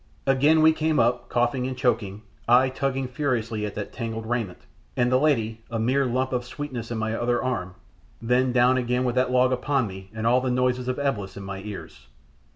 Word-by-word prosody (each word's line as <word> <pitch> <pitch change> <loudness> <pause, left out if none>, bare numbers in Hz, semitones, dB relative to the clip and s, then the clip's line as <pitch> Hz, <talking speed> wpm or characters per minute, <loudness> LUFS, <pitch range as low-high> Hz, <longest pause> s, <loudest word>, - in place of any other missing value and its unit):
Again 145 +4 +4
we 160 - +7
came 155 0 0
up, 120 +1 +1
coughing 120 +1 0
and 130 -1 -5
choking 105 -5 -1 0.2
I 125 +2 +5
tugging 135 0 -2
furiously 120 -5 -2
at 105 - -8
that 105 - -5
tangled 115 -2 -4
raiment, 110 -6 -2 0.4
and 120 0 +2
the 130 - +4
lady, 115 -7 +1
a 115 - -3
mere 130 +4 +1
lump 130 +2 -1
of 125 -1 0
sweetness 120 -2 -6
in 120 - -3
my 110 0 -1
other 120 +1 0
arm 95 -8 -3 0.4
then 125 +2 +2
down 125 +1 +4
again 125 +1 0
with 125 -1 0
that 130 0 +1
log 125 0 +3
upon 130 0 0
me 95 -1 -9
and 110 0 -5
all 125 +2 +4
the 130 - -1
noises 125 0 0
of 130 - -1
Eblis 115 -10 -2
in 100 - -7
my 95 0 -6
ears. 105 -1 -9
125 Hz, 205 wpm, -25 LUFS, 115-130 Hz, 0.4 s, we